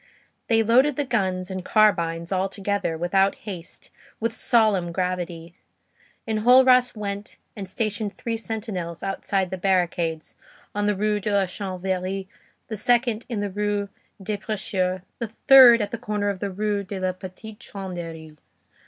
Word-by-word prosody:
They 225 -1 +3
loaded 255 +6 +4
the 290 - -1
guns 190 -6 -1
and 185 -1 -4
carbines, 170 -6 +2
all 190 0 0
together, 200 -4 -2
without 195 +4 +2
haste, 180 -5 -8 0.3
with 230 0 -1
solemn 215 -8 +2
gravity. 175 -2 -3 0.7
Enjolras 250 +3 +5
went 205 0 -5 0.2
and 195 -4 -7
stationed 210 0 -3
three 230 -1 -3
sentinels 215 -7 -5
outside 195 -1 -1
the 190 - -4
barricades, 175 -4 0 0.4
one 205 0 -1
in - - +1
the 210 - +2
Rue 210 +1 0
de 205 +1 -2
la 200 -1 +3
Chanvrerie, 190 0 -3 0.4
the 220 - -4
second 235 0 +1
in 225 -4 -2
the 205 -1 -3
Rue 205 0 -1 0.3
des 205 +2 -3
Prêcheurs, 190 -3 -2 0.2
the 235 - -2
third 240 0 +7
at 205 - -5
the 235 - -4
corner 210 -3 -1
of 200 -2 -3
the 200 - -2
Rue 205 +1 -1
de 195 0 -6
la 185 0 0
Petite 190 +4 -10
Truanderie. 165 -5 -8
200 Hz, 155 wpm, -24 LUFS, 185-215 Hz, 0.7 s, third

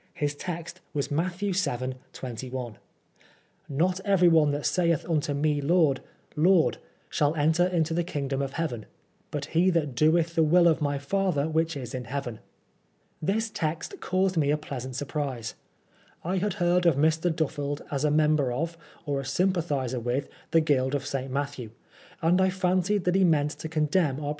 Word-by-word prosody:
His 145 -1 -1
text 170 +2 -6
was 140 -1 -1
Matthew 180 +6 -1
vii., 130 -9 -1 0.2
21: 125 -1 -6 0.5
" - - -33
Not 180 +6 +1
everyone 175 -6 +4
that 145 0 -2
saith 170 -4 +1
unto 150 -3 0
me 145 0 +1
Lord, 150 -2 +3 0.3
Lord, 170 +2 +3 0.3
shall 150 +1 +1
enter 160 +4 +3
into 165 -3 0
the 175 +1 +1
kingdom 140 -4 -2
of 135 -1 -3
heaven; 125 -10 -3 0.4
but 145 -1 -3
he 175 +3 +4
that 160 -6 0
doeth 160 +5 +3
the 165 - +2
will 170 +3 +5
of 160 -2 +3
my 145 -1 0
father 155 0 0
which 160 0 0
is 125 -2 -7
in 125 -1 -4
heaven." 130 -3 -4 0.8
This 215 +7 0
text 165 - -3
caused 185 0 0
me 145 -3 +2
a 150 - +3
pleasant 130 -4 -6
surprise. 135 -5 -3 0.7
I 185 +3 -1
had 200 +1 0
heard 175 -2 +2
of 165 - +4
Mr. 160 +4 +2
Duffeld 145 -3 -2
as 140 -1 -1
a 150 - +3
member 150 -3 +3
of, 165 +6 -3 0.3
or 140 -2 -1
a - - -4
sympathiser 145 -5 0
with, 125 +4 -1 0.2
the 165 - +4
Guild 140 -3 +1
of 140 - -2
St. 135 -1 -3
Matthew; 140 -4 -3 0.5
and 175 +3 +4
I 190 - +4
fancied 185 +1 +1
that 180 - +1
he 190 0 +4
meant 150 -4 +3
to 160 - -7
condemn 155 -2 +1
our. 145 -1 -3
155 Hz, 170 wpm, -27 LUFS, 140-175 Hz, 0.8 s, will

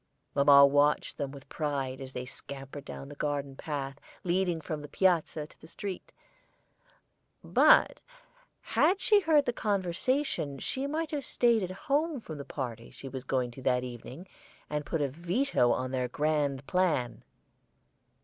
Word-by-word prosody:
Mamma 140 0 +8
watched 145 +1 +2
them 140 -2 -1
with 140 0 -11
pride 140 -4 -3
as 130 -1 -7
they 125 -1 -5
scampered 135 +2 -8
down 135 - -8
the 145 - -9
garden 145 -2 -3
path 140 -2 -4 0.2
leading 180 -1 +1
from 155 -1 -5
the 145 - -8
front - - -32
piazza 170 -4 +2
to - - -19
the 160 - -12
street, 195 +2 -6 1.3
but - - +5 0.6
had 380 +2 +2
she 420 +2 +5
heard 315 -6 +3
their 245 - 0
conversation 200 - -1
she 265 - -3
might 315 +1 -2
have 290 -2 -2
staid 235 -3 +3
at 185 - -2
home 285 - -1
from 155 -9 -8
the - - -4
party 120 -5 -5
she 135 - -10
was 130 -1 -6
going 130 -2 -1
to 130 - -11
that 125 -1 +1
evening, 125 +7 -8 0.4
and 150 -1 -2
put 160 -3 0
a - - +2
veto 170 - +1
on 130 0 -1
their 130 -1 0
grand 145 0 0
plan. 165 -10 0
150 Hz, 160 wpm, -30 LUFS, 135-190 Hz, 1.3 s, Mamma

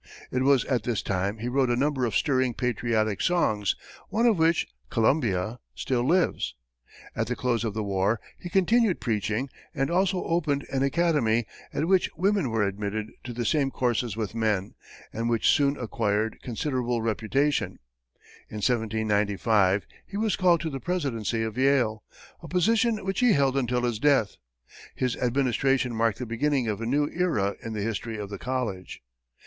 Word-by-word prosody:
It 130 - 0
was 135 -2 +4
at 125 -4 0
this 115 0 -2
time 100 +2 -1
he 115 +2 -4
wrote 130 0 +1
a 120 - +2
number 135 0 +1
of 105 - -4
stirring 130 -2 +1
patriotic 115 -4 0
songs, 110 - +1 0.3
one 230 +2 +1
of 220 -7 +4
which, 165 +1 +3 0.2
"Columbia," 110 - +1 0.2
still 125 -2 -1
lives. 170 +7 +1 0.6
At 115 - -1
the 125 - -1
close 120 -2 0
of 110 -3 -3
the 110 - -1
war, 100 +2 0 0.2
he 175 - -7
continued 195 +2 +3
preaching 110 +2 -1 0.3
and 135 +2 0
also 185 +1 +1
opened 150 -5 0
an 135 -1 0
academy, 135 -7 +2 0.3
at 160 - -1
which 190 0 +3
women 195 -4 +1
were 110 -2 +1
admitted 105 +2 -3
to 120 - -5
the 120 0 -3
same 140 +2 +2
courses 120 -4 -1
with 110 -2 -3
men, 110 -4 0 0.4
and 115 +2 -1
which 115 -2 +1
soon 140 0 +3
acquired 110 -2 -1
considerable 125 -2 -2
reputation. 115 +6 0 0.7
In 110 - -7
1795, 105 -3 +1 0.2
he 200 - -6
was 215 -2 +1
called 175 -4 +3
to 160 -1 -3
the 135 - -4
presidency 120 - -1
of 110 +2 -4
Yale, 130 -6 +2 0.4
a - - -9
position 220 +4 +2
which 195 -1 -1
he 250 -3 +5
held 135 -2 +2
until 125 -2 0
his 120 -3 -1
death. 135 - +2 0.6
His 125 -2 0
administration 130 0 +1
marked 115 -2 +1
the 125 - -4
beginning 125 +2 0
of 105 0 -2
a 115 - -2
new 145 +4 +2
era 110 - 0
in 115 - -5
the 105 -2 -3
history 115 +1 -3
of 105 -1 -6
the 100 - -6
college. 120 - -4
125 Hz, 170 wpm, -26 LUFS, 110-145 Hz, 0.7 s, he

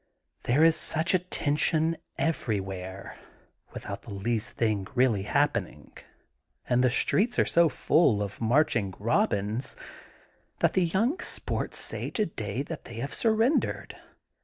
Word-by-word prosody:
There 135 +6 +3
is 165 0 +6
such 160 +2 +3
a 185 - +4
tension 160 -1 +1 0.2
everywhere 95 - -3 0.5
(without 100 - -7
the 115 - -12
least 105 +2 -3
thing 105 -4 0
really 125 -5 +2
happening) - - -1 0.7
and 125 +1 +2
the 130 - +4
streets 210 - +1
are - - +3
so 170 -1 +3
full 135 -10 +2
of 100 +2 -8
marching 115 -5 +1
Eobins 105 +2 -1 0.8
that - - +1
the 185 - +2
young 225 - 0
sports - - -2
say - - +1
today 130 - -3
that 160 +1 -8
they 120 - -10
have 135 +5 -5
surrendered. 225 +5 +1
130 Hz, 130 wpm, -27 LUFS, 105-165 Hz, 0.8 s, is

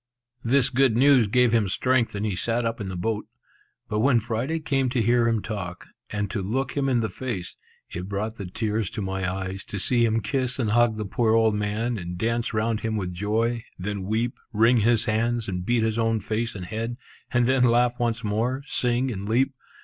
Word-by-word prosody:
This 130 +2 +3
good 130 -3 +3
news 130 -3 +5
gave 125 +2 +3
him 115 -3 +3
strength, 120 +4 +1
and 100 +1 -2
he 105 -4 -1
sat 115 +5 -1
up 115 -1 -2
in 100 - -4
the 95 - -5
boat. 110 +3 -2 0.6
But 105 - -1
when 125 +1 +4
Friday 120 +8 -2
came 135 -5 0
to 125 0 0
hear 120 +1 +3
him 115 -3 +1
talk, 90 -5 -5 0.2
and 105 -1 -2
to 105 - -2
look 125 +8 -2
him 140 -1 +1
in 120 -3 +2
the 110 - -1
face, 100 -7 -5 0.3
it 90 +2 -6
brought 105 +3 -3
the 100 - -5
tears 105 +1 -2
to - - -5
my 95 -1 -2
eyes 95 +1 -4
to 100 - -5
see 120 +5 +2
him 115 -1 +2
kiss 130 0 -1
and 115 -5 0
hug 120 -1 +3
the 105 - -3
poor 110 +3 +1
old 110 -1 +4
man, 105 +3 -1
and 90 0 -6
dance 115 +4 0
round 110 0 0
him 110 -1 -2
with 90 -3 -3
joy, 110 +5 0
then 100 +2 -4
weep, 110 +5 -1
wring 115 +3 +4
his 115 0 +3
hands, 115 +1 0
and 90 -1 -4
beat 120 -1 +2
his 110 0 0
own 115 -1 +1
face 110 +2 -2
and 95 -2 -6
head, 115 +4 -4 0.3
and 120 -1 +2
then 130 0 +3
laugh 120 0 +3
once 120 -1 0
more, 115 +6 -1
sing, 125 -1 0
and 100 -1 -5
leap. 130 +4 +2
115 Hz, 215 wpm, -25 LUFS, 105-120 Hz, 0.6 s, news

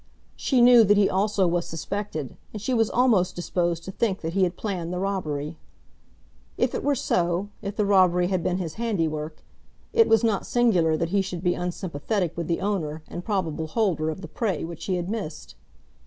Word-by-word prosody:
She 260 -3 +2
knew 240 -1 +8
that 205 +1 +4
he 205 -1 +5
also 200 0 +1
was 175 0 0
suspected, 165 - -4 0.2
and 215 - -6
she 255 +5 -2
was 225 -2 +2
almost 230 -8 +2
disposed 175 -1 -1
to 190 - -6
think 195 -1 -1
that 165 0 -3
he 195 - +1
had 175 0 -4
planned 180 -5 -3
the 180 - -3
robbery. 165 -6 -3 1.0
If - - +1
it - - -3
were 290 0 +2
so, 175 -3 0
if 200 0 -5
the 210 - +1
robbery 185 -3 +4
had 185 -1 0
been 180 +2 0
his 170 -4 -4
handiwork, 160 -8 -2 0.5
it 455 -1 +5
was 225 +1 +4
not 220 -4 +1
singular 180 -10 +3
that 165 +1 -1
he 200 +2 +2
should 180 -2 -5
be 180 -1 +2
unsympathetic 180 +1 -2
with 170 -2 -4
the 170 - -1
owner 160 -7 -2
and 175 - -7
probable 165 -7 -2
holder 165 -4 0
of 160 +4 -5
the - - -7
prey 200 -9 -2
which 165 -1 -7
he 190 - 0
had 175 -1 -3
missed. 200 -7 -5
185 Hz, 200 wpm, -25 LUFS, 170-205 Hz, 1.0 s, knew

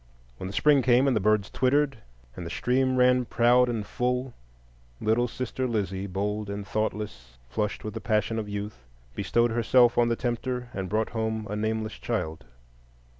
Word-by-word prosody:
When 95 - -5
the 95 - -7
spring 145 +4 +4
came, 125 +1 +4
and 135 -3 +2
the - - +3
birds 105 0 +1
twittered, 135 0 +1 0.4
and 90 - -6
the 85 - -6
stream 130 +7 +1
ran 125 0 +4
proud 120 +2 +4
and 110 -4 -2
full, 125 +2 -1 0.7
little 115 +3 +2
sister 130 +1 -3
Lizzie, 100 -4 -2
bold 105 +2 -2
and 100 0 -4
thoughtless, 105 - -4
flushed 100 +12 -2
with 110 - -5
the 110 - -5
passion 110 +2 0
of 105 -1 -5
youth, 100 - -6 0.3
bestowed 120 - +1
herself 120 +1 +4
on 120 - +4
the 115 - +1
tempter, 125 +1 -3
and 95 -2 -4
brought 110 +1 0
home 110 -1 -2
a - - -2
nameless 110 0 -2
child. 80 -6 -3
110 Hz, 175 wpm, -27 LUFS, 105-125 Hz, 0.7 s, spring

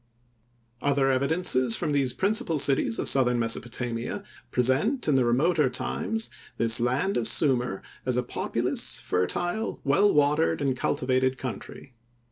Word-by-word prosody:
Other 140 -1 +1
evidences 130 -3 +2
from 150 - -2
these 140 -3 +1
principal 200 - 0
cities 135 -5 +3
of - - -2
southern 125 -2 +3
Mesopotamia, 120 0 -3 0.3
present, 135 - +1
in 150 - +2
the 130 -1 +3
remoter 140 +5 +2
times, 225 - -3 0.3
this 115 0 +4
land 125 +11 0
of 115 -2 +1
Sumir 125 -5 +2 0.2
as 125 -1 -1
a 125 - 0
populous, - - -1
fertile, 175 - -2
well 195 +9 +3
watered 150 +3 +1
and 135 -2 -1
cultivated 130 +1 0
country. 130 0 -8
130 Hz, 130 wpm, -26 LUFS, 125-155 Hz, 0.3 s, this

